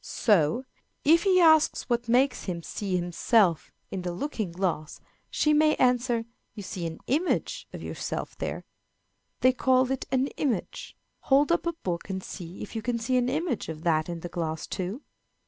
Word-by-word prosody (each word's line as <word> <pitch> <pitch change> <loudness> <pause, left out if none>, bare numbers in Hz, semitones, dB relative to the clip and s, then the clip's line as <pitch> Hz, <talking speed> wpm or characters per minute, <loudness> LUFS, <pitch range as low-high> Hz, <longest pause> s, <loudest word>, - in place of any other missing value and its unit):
So, 205 - +2 0.4
if 330 +4 +5
he 375 -2 +5
asks 315 -3 +5
what 240 -1 -1
makes 255 +3 +2
him 170 -3 -4
see 195 +1 -3
himself 175 +1 +2 0.2
in 190 - -3
the 180 0 -3
looking 215 - -3
glass, 170 -4 -2 0.3
she 300 - +2
may 305 0 +4
answer, 245 -2 +2 0.3
"You 205 - -7
see 180 -2 -4
an 160 - -8
image 345 - -1
of - - -8
yourself - - -4
there. - - -4 0.8
They 255 0 +5
call 255 0 +2
it 265 - -3
an 260 0 +2
image. 250 -10 -3 0.3
Hold 280 +3 +5
up 340 0 +1
a 340 - 0
book 180 - -4
and 190 -1 -3
see 175 -1 -8
if 210 - -9
you 225 - -2
can 240 +1 -1
see 230 +3 -1
an 250 0 +2
image 295 - -2
of 160 0 -7
that 155 -1 +1
in 170 -1 -5
the 175 - -5
glass 160 -2 -3
too." 195 +9 -4
230 Hz, 180 wpm, -27 LUFS, 175-270 Hz, 0.8 s, if